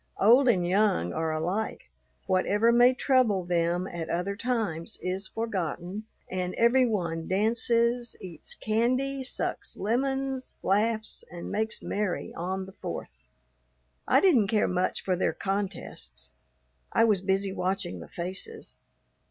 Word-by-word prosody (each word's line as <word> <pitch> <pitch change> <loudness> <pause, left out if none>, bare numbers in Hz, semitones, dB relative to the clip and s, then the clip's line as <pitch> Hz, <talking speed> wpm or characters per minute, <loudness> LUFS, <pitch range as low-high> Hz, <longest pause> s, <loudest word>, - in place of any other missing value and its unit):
Old 245 +6 +6
and 180 -6 +3
young 185 - +2
are 160 0 -1
alike; 165 - -2 0.3
whatever 205 +5 +3
may 240 +1 +6
trouble 255 -7 +2
them 175 +1 +1
at 170 -3 -5
other 180 +4 -1
times 210 -8 -2
is 185 +2 -3
forgotten, 195 -2 -3 0.2
and 180 -1 -3
every 250 +2 +4
one 170 -7 -2
dances, 235 +4 +1
eats 170 -4 -6
candy, 255 +5 0
sucks 255 - -3
lemons, 265 +4 -1
laughs, 215 +3 0
and 175 -1 -7
makes 220 +1 -2
merry 205 -3 -2
on 185 +2 -3
the 190 - -11
Fourth. 65 - -7 0.9
I - - +6
didn't 270 - +5
care 210 0 +2
much 180 0 0
for 185 - +1
their 180 - +1
contests. 185 - -4 0.6
I - - +4
was 210 -5 +3
busy 195 0 0
watching 185 - -2
the 85 - -9
faces. 190 - -5
200 Hz, 130 wpm, -28 LUFS, 180-235 Hz, 0.9 s, Old